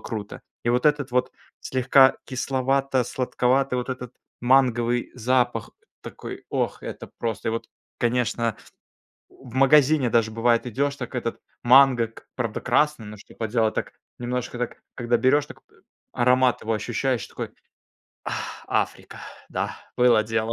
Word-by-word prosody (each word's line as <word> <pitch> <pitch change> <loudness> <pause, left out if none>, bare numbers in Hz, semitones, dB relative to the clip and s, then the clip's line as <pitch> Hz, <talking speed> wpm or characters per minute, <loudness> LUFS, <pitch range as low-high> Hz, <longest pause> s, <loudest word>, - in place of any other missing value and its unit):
круто! 105 -3 -6 0.2
И 120 - +2
вот 125 +4 +2
этот 145 -4 +1
вот 125 0 +1 0.3
слегка 130 +1 +4
кисловато-сладковатый, 130 0 0
вот 125 +1 -3
этот 125 -1 -6 0.3
манговый 120 -2 +2
запах. 125 -2 0 0.3
Такой, - - -8
ох! - - -2
Это - - -7
просто 115 -1 -2
И - - +1
вот, 115 - -4 0.3
конечно 120 -2 0 0.7
В 125 -3 -15
магазине 135 -1 +4
даже 115 -2 +2
бывает- 115 +1 +2
идёшь, 140 +4 -1
так 125 -1 -7
этот 115 -1 -3 0.2
манго, 125 -1 +6
к 115 - -17
правда 115 -4 -2
красный, 140 0 +1
но 105 0 -9
что 105 - -16
поделать, 110 -1 0
так - - -3 0.3
немножко, 125 0 -3
так, 125 - -4
когда 120 0 +1
берёшь, 145 +4 +3
так - - -13 0.5
аромат 125 +1 +3
его 115 - -1
ощущаешь 120 +2 -1
такой: - - -6 0.7
"Ах, - - -5
Африка! - - -2 0.3
Да, - - -3 0.2
было 120 -3 +5
дело!" 110 +1 -1
125 Hz, 135 wpm, -24 LUFS, 115-130 Hz, 0.7 s, манго